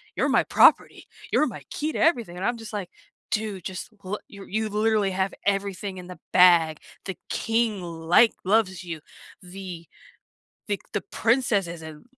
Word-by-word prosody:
"You're - - +1
my - - +4
property. - - +4 0.2
You're 305 - +4
my - - -8
key 305 +2 -2
to - - -3
everything." 235 - +2
And 185 - -5
I'm 240 -1 0
just 225 -1 -10
like, 200 -4 -4 0.4
"Dude, 210 -4 -2
just 185 -1 -6
lo 200 +3 -3
you 200 -1 -11
you've 215 0 -2
literally 215 -2 +2
have 190 +1 -1
everything 195 -1 -1
in 180 - -10
the 180 - -9 0.2
bag, 170 -4 +6 0.3
the 190 - -5
king, 225 -3 0
like 170 +6 +3
loves 190 -3 +1
you, 165 -3 -6 0.4
the 180 -2 -8 0.8
the 205 - -1
the 205 - 0
princess 225 -5 +1
is 170 -1 -8
in 155 -1 -10
195 Hz, 170 wpm, -25 LUFS, 180-220 Hz, 0.8 s, bag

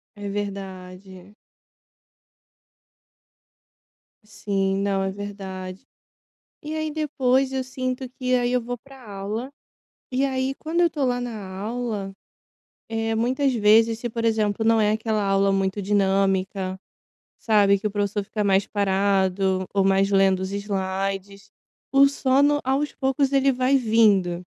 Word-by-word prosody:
É 205 0 -7
verdade. 190 -1 -7 2.9
Sim, 195 -2 -2
não, 195 -1 0
é 190 - -1
verdade. 195 +1 -7 0.8
E 305 +1 -5
aí 310 0 -2
depois, 270 -3 0
eu 265 -1 -1
sinto, 255 0 -4
que 255 -1 0
aí 245 0 +1
eu 250 - +2
vou 245 +1 -5
pra 270 0 -16
aula, 210 +6 -5 0.6
e 265 +2 +1
aí, 265 0 -1
quando 325 +4 -2
eu - - +5
estou 295 -4 -1
lá 245 -1 0
na 220 -5 -6
aula, 215 -2 -4 0.8
eh, 225 0 -1
muitas 255 +4 +1
vezes, 225 +1 +4
se 240 -1 -4
por 230 0 -4
exemplo, 220 -1 +1
não 225 0 +4
é 210 0 +3
aquela 220 -1 -1
aula 195 0 +2
muito 195 +1 0
dinâmica, 195 -1 0 0.6
sabe, 205 -3 +3
que 210 - -4
o - - 0
professor, 205 0 -2
fica 210 +1 -3
mais 195 0 +2
parado, 190 -1 +1
ou 195 -1 +3
mais 195 +1 +3
lendo 195 -1 +3
os 190 +1 -4
slides, 195 0 -3 0.4
o 275 0 +6
sono 280 +1 +2
aos 275 +3 0
poucos 270 +1 0
ele 275 0 +3
vai 255 +2 +2
vindo. 210 -7 +3
210 Hz, 135 wpm, -23 LUFS, 195-255 Hz, 2.9 s, o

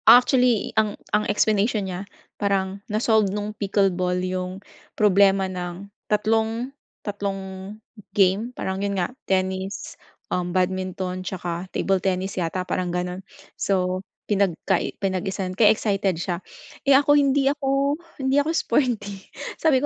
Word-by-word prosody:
Actually, 250 -2 +5
ang 210 -1 -3 0.2
ang 210 0 +2
explanation 210 0 +2
niya 190 +2 -5 0.3
parang 195 -1 0
na-solved 215 -1 +3
nung 210 +2 -3
pickle 200 -2 +1
ball 180 0 0
yung 185 0 -2 0.4
problema 195 -2 +5
ng 185 +1 -6 0.2
tatlong 225 +4 +1 0.3
tatlong 195 -1 -4 0.4
game. 195 +4 +3
Parang 190 +1 -2
yun 200 -1 -1
nga 180 +6 -1 0.2
tennis, 190 +1 -1 0.4
um, 180 -1 0
badminton 185 0 -1
'tsaka 180 -1 -4
table 195 0 0
tennis 190 +1 -1
yata, 180 +1 -2
parang 180 -1 -1
gano'n. 180 +1 -3 0.3
So, 185 -1 0 0.2
pinagka 195 -2 +1 0.2
pinag-isa 190 0 -2
kaya 210 +2 +5
excited 195 -4 +1
siya. 175 +1 -3 0.4
Eh, 275 -1 +6
ako 290 +1 +4
hindi 280 -1 +4
ako 275 0 +1 0.2
hindi 270 +1 +2
ako 295 - -2
sporty. 210 -8 0 0.3
Sabi 290 -4 +4
195 Hz, 125 wpm, -24 LUFS, 185-215 Hz, 0.4 s, Eh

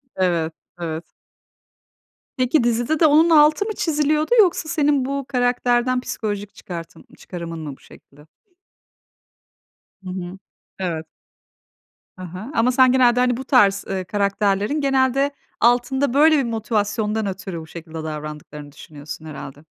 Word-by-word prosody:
Evet, 170 -3 0 0.3
evet. 165 0 -5 1.2
Peki 255 +2 +2
dizide 240 +6 0
de 325 - +5
onun 315 +3 +5
altı 305 +4 +5
mı 435 - -3
çiziliyordu 305 +2 0
yoksa 355 -5 +3
senin 290 -4 +2
bu 275 0 -3
karakterden 245 0 +1
psikolojik 205 -4 -5
çıkartım 165 -2 -9
çıkarımın 170 -2 -7
mı 150 -3 -6
bu - - -29
şekilde? 145 +2 -18 1.8
Hı 185 - -7
hı. 180 0 -6 0.4
Evet. 165 -4 -3 1.1
Hı 185 - -8
hı, 185 - -8
ama 240 +2 +3
sen 255 0 +5
genelde 245 -2 +4
hani 250 -1 +2
bu 265 - -5
tarz, 205 -7 +4
ııı, 190 -1 -3
karakterlerin 200 - 0
genelde 270 +1 +2 0.3
altında 245 +2 +2
böyle 305 +2 +5
bir 275 - +2
motivasyondan 215 -1 -1
ötürü 190 -2 -5
bu 160 - -12
şekilde 165 -1 -11
davrandıklarını 150 -1 -7
düşünüyorsun 150 +1 -10
herhâlde? 145 0 -9
220 Hz, 130 wpm, -21 LUFS, 170-265 Hz, 1.8 s, de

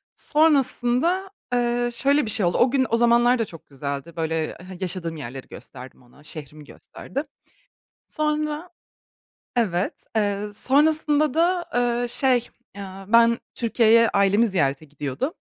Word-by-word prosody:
Sonrasında, 300 +4 +2 0.2
eee, 240 0 +1
şöyle 280 +4 +2
bir - - -4
şey 215 -4 +2
oldu, 175 - +1
o 245 - +3
gün, 260 -1 +2
o 230 - +2
zamanlar 240 +1 +4
da 225 - +1
çok 165 -5 -14
güzeldi, 140 +3 -6
böyle 160 -1 -2
ha 185 +2 -12
yaşadığım 180 -3 -3
yerleri 135 -2 -8
gösterdim 130 +1 -12
ona, 125 +4 -21
şehrimi 150 -1 -9
gösterdim. 275 - -7 0.8
Sonra, 305 +2 -2 0.9
evet, 190 -6 -1
eee, 205 -2 +1 0.2
sonrasında 300 +3 +2
da, 345 +2 +2
eee, 245 0 0
şey, 250 -1 +2 0.3
aaa, 195 -1 -8
ben 235 0 +5 0.2
Türkiye'ye 230 -1 +3
ailemi 200 +3 +3
ziyarete 145 -6 0
gidiyordum. 145 - -4
235 Hz, 130 wpm, -23 LUFS, 170-270 Hz, 0.9 s, ben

